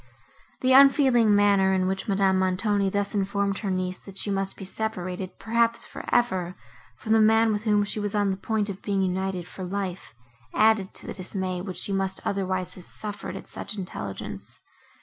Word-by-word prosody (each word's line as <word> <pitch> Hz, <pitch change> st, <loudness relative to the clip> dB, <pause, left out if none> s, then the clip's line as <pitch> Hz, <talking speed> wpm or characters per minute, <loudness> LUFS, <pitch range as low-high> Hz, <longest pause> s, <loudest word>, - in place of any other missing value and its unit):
The 255 Hz, 0 st, +4 dB
unfeeling 265 Hz, -5 st, +6 dB
manner, 200 Hz, -2 st, +4 dB
in 185 Hz, -1 st, +1 dB
which 190 Hz, +1 st, -2 dB
Madame 195 Hz, -2 st, +2 dB
Montoni 195 Hz, +2 st, +1 dB
thus 200 Hz, +1 st, -1 dB
informed 200 Hz, 0 st, 0 dB
her 205 Hz, -, -3 dB
niece, 185 Hz, 0 st, -2 dB
that 195 Hz, -1 st, -10 dB
she 205 Hz, -, -1 dB
must 195 Hz, 0 st, -1 dB
be 195 Hz, -, -7 dB
separated, 185 Hz, -3 st, -3 dB
perhaps 230 Hz, +1 st, +1 dB
for -, -, -9 dB
ever, 185 Hz, -7 st, +1 dB, 0.4 s
from 220 Hz, -, -5 dB
the 220 Hz, 0 st, +6 dB
man, 225 Hz, +1 st, +5 dB
with 210 Hz, +2 st, -3 dB
whom 210 Hz, -1 st, +3 dB
she 205 Hz, +1 st, -2 dB
was 205 Hz, 0 st, -3 dB
on 205 Hz, -1 st, +2 dB
the 190 Hz, -, -3 dB
point 210 Hz, +1 st, -1 dB
of 200 Hz, -2 st, -6 dB
being 195 Hz, -2 st, 0 dB
united 185 Hz, -1 st, -2 dB
for 185 Hz, -, -8 dB
life, 185 Hz, -, -4 dB, 0.4 s
added 215 Hz, -3 st, +3 dB
to -, -, -6 dB
the -, -, -5 dB
dismay, 185 Hz, -1 st, -3 dB
which 185 Hz, -1 st, -6 dB
she 200 Hz, -, 0 dB
must 190 Hz, 0 st, -1 dB
otherwise 185 Hz, -2 st, -1 dB
have 180 Hz, -, -13 dB
suffered 210 Hz, -1 st, -6 dB
at -, -, -8 dB
such 215 Hz, -, -7 dB
intelligence. 100 Hz, -, -6 dB
195 Hz, 190 wpm, -26 LUFS, 185-210 Hz, 0.4 s, unfeeling